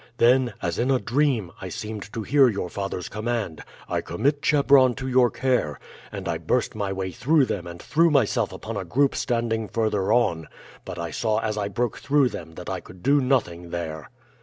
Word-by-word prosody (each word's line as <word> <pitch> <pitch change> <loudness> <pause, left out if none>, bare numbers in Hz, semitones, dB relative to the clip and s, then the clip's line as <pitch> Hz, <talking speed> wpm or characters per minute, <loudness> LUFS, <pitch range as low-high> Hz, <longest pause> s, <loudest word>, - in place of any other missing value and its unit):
Then, 125 0 +4
as 85 -1 -1
in 125 +3 +1
a 130 -2 +3
dream, 125 - 0
I 95 - -5
seemed 105 +2 -6
to 110 - -3
hear 135 +3 +5
your 100 -5 -3
father's 95 -2 -4
command, 110 -6 -3 0.2
'I - - -1
commit 140 - 0
Chebron 140 -4 +5
to 130 0 -5
your 125 -1 +4
care,' 125 - 0 0.3
and 100 -3 -6
I 85 -1 -1
burst 100 +10 0
my 100 -2 -2
way 95 -1 -3
through 140 - +3
them 90 -7 -4
and 85 0 -8
threw 165 - +3
myself 140 -8 +2
upon - - -6
a - - -2
group 140 +2 +2
standing 115 -2 -1
further 105 -3 0
on, 85 -10 +2 0.4
but - - -7
I 85 -1 -4
saw 110 +5 0
as 110 -1 -1
I 105 -1 -1
broke 120 +3 -2
through 140 -2 +3
them 80 -6 -8
that 90 - -9
I 95 -1 -2
could 90 0 -15
do 140 +1 +4
nothing 90 -10 0
there. 80 -3 -5
110 Hz, 200 wpm, -24 LUFS, 90-130 Hz, 0.4 s, hear